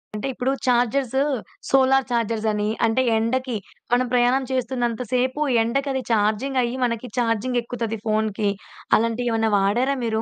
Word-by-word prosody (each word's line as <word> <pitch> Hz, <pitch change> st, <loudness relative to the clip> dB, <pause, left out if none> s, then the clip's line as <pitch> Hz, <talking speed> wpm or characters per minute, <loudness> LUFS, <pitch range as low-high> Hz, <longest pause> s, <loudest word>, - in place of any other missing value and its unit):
అంటే 210 Hz, +6 st, -3 dB
ఇప్పుడు 250 Hz, +2 st, -1 dB, 0.2 s
chargers, 250 Hz, +2 st, +2 dB, 0.5 s
solar 270 Hz, 0 st, +4 dB
chargers 230 Hz, -2 st, -1 dB
అని, 210 Hz, 0 st, -1 dB, 0.2 s
అంటే 225 Hz, +3 st, +2 dB, 0.2 s
ఎండకి 250 Hz, +2 st, -1 dB, 0.4 s
మనం 250 Hz, +1 st, +3 dB
ప్రయాణం 250 Hz, +2 st, +3 dB
చేస్తున్నంత 245 Hz, -2 st, -1 dB
సేపు 255 Hz, +4 st, 0 dB, 0.2 s
ఎండకది 270 Hz, +2 st, -1 dB
చార్జింగ్ 220 Hz, +5 st, +1 dB
అయ్యి 240 Hz, +2 st, -2 dB
మనకి 235 Hz, +1 st, -3 dB
చార్జింగ్ 240 Hz, +1 st, +1 dB
ఎక్కుతది 230 Hz, -2 st, -4 dB
ఫోన్‌కి. 215 Hz, -1 st, 0 dB, 0.5 s
అలాంటియేమైనా 230 Hz, 0 st, 0 dB
వాడారా 240 Hz, +8 st, +1 dB
మీరు? 220 Hz, -1 st, 0 dB
240 Hz, 130 wpm, -23 LUFS, 225-260 Hz, 0.5 s, solar